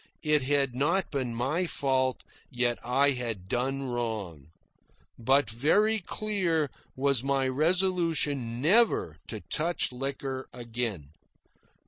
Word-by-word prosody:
It 150 -1 +3
had 135 -1 +1
not 165 +9 0
been 130 -5 -2
my 145 +10 0
fault, 130 -4 0 0.3
yet 120 -1 0
I 135 +4 +3
had 115 -8 -4
done 135 +5 -1
wrong. 110 - -4 0.7
But 135 +5 +3
very 205 - +2
clear 175 -7 -1 0.2
was 135 -2 +2
my 135 -1 +1
resolution 155 -5 +1
never 175 - +3
to 110 - -6
touch 170 -2 -1
liquor 135 0 -4
again. 115 - -4
135 Hz, 110 wpm, -28 LUFS, 120-155 Hz, 0.7 s, It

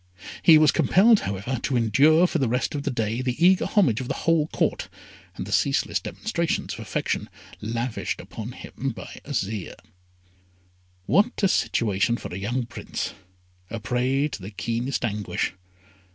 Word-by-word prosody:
He 160 -2 +8
was 155 -1 +5
compelled, 210 +4 +5
however, 100 +6 -3
to 130 - 0
endure 140 - +5
for 170 - 0
the 135 - +2
rest 125 +5 0
of 145 - -2
the 145 - -2
day 115 -1 -1
the 125 -1 -2
eager 185 0 +5
homage 135 - +2
of 125 - -5
the - - -2
whole 165 -2 +3
Court, - - -1 0.5
and - - -5
the - - -8
ceaseless - - +1
demonstrations 170 -7 -2
of - - -8
affection - - -2 0.3
lavished 115 +2 -3
upon 115 +2 -7
him 135 0 -5
by 95 - -9
Azire. 110 - -3 1.3
What 210 - +2
a - - +6
situation 115 - +1
for - - -8
a 90 - -4
young 120 +5 -2
Prince, 115 - -5 0.6
a 115 - -4
prey 125 +6 0
to 110 - -7
the 95 - -7
keenest 115 +5 -2
anguish. 105 -4 -2
125 Hz, 160 wpm, -25 LUFS, 110-155 Hz, 1.3 s, He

